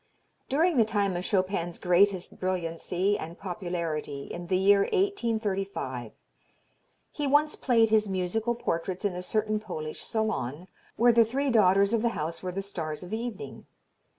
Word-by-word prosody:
"During 320 +3 +2
the 230 - +7
time 205 -4 0
of 175 - -2
Chopin's 185 -3 0
greatest 185 +1 +2
brilliancy 185 +2 -1
and 165 +3 -7
popularity, 170 -7 -4
in 175 0 -6
the 185 - +2
year 200 +2 +5
1835, 205 - -1 1.0
he 295 -2 -2
once 295 +2 +3
played 230 -4 +3
his 215 -2 +3
musical 195 +6 -1
portraits 180 -2 -3
in 200 - +1
a 180 - -4
certain 215 +3 0
Polish 155 -7 -6
salon, 185 - -2 0.3
where 240 +1 +5
the 230 0 +6
three 265 +5 -1
daughters 200 -1 +4
of 230 - +2
the 235 - +2
house 165 +2 -3
were 185 - -3
the 195 +2 -4
stars 160 -5 -5
of 180 - -10
the 220 - -1
evening. 225 - -7
195 Hz, 155 wpm, -28 LUFS, 175-225 Hz, 1.0 s, the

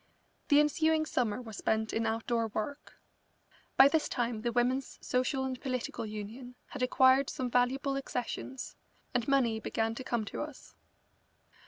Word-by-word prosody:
The 290 - +6
ensuing 315 +1 +3
summer 245 -6 0
was 220 -4 -9
spent 220 0 0
in 225 0 0
outdoor 230 +1 0
work. 220 +7 -5 0.8
By 270 - +10
this 315 +2 +1
time 235 -3 -1
the 240 +1 -1
Women's 250 +3 0
Social 255 +2 0
and 260 -1 -4
Political 255 -4 -3
Union 220 +4 -7
had - - -7
acquired 260 +1 +4
some 250 -2 -3
valuable 265 +3 +1
accessions, 265 0 -4 0.4
and 245 -2 0
money 250 -5 +2
began 225 0 -1
to 260 - -6
come 235 -3 -1
to - - -5
us. 300 -2 -8
250 Hz, 150 wpm, -31 LUFS, 225-270 Hz, 0.8 s, By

